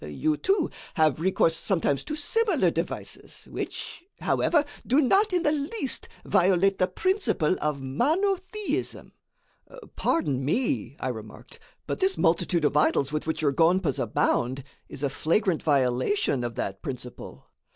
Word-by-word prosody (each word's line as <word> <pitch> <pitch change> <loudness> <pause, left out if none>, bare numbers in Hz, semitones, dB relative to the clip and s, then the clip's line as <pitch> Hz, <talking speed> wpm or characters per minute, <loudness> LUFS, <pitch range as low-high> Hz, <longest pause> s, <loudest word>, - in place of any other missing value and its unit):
You, 75 - -1
too, 380 - +1 0.2
have 155 -4 +3
recourse 165 -2 +2
sometimes 160 -8 0
to 305 - -3
similar 315 - +1
devices, 165 +2 -5
which, - - -6 0.2
however, 305 -3 +2 0.2
do 265 +4 +4
not 390 - +3
in 355 -2 +1
the 295 - +3
least 295 - -3 0.2
violate 195 0 +3
the 185 - +3
principle 185 - +1
of 150 -3 -1
monotheism." 375 - -1 0.8
"Pardon 140 - 0
me," 140 - -1
I 130 - -2
remarked, 110 -3 -9 0.3
"but - - -3
this 385 0 +2
multitude 170 -1 +2
of 145 - +1
idols 150 -2 +2
with 155 +1 -3
which 160 0 -2
your 145 - +3
gonpas 165 -1 +2
abound, 125 +3 0 0.3
is 140 - -7
a 140 - +2
flagrant 170 +4 +1
violation 130 +1 +1
of 120 -1 -4
that 95 0 -4
principle." 125 -2 -8
170 Hz, 140 wpm, -26 LUFS, -, 0.8 s, do